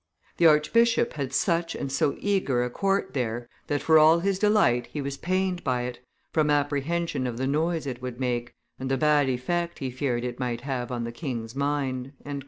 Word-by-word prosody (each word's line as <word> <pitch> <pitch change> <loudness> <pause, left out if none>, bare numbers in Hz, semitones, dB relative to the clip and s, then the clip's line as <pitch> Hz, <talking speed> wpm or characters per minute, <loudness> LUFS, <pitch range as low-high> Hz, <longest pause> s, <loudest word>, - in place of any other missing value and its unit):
The 170 - +6
archbishop 230 +10 +3
had 140 -3 -3
such 165 +4 0
and 135 - -4
so 140 +1 +1
eager 185 -12 +1
a 125 - -3
court 195 -3 0
there, 120 -2 -2 0.2
that 145 - -1
for 160 -1 +6
all 160 +2 +7
his 195 0 0
delight 205 - +3
he 150 - -6
was 140 -1 -3
pained 185 +2 -1
by 125 -2 0
it, 125 0 -5 0.3
from 155 -2 +2
apprehension 145 +1 0
of 120 -2 -4
the 130 - -1
noise 160 +3 0
it 125 -3 -5
would 125 -1 -6
make, 120 -2 -2 0.2
and 130 0 -4
the 135 - +1
bad 145 -1 +3
effect 170 +7 -1
he 130 -2 -4
feared 125 -2 -1
it 125 0 -4
might 120 -2 -2
have 125 -2 -3
on 120 -1 -2
the 115 - -4
king's 120 -3 -5
mind." 135 -2 -2
140 Hz, 195 wpm, -26 LUFS, 125-165 Hz, 0.3 s, all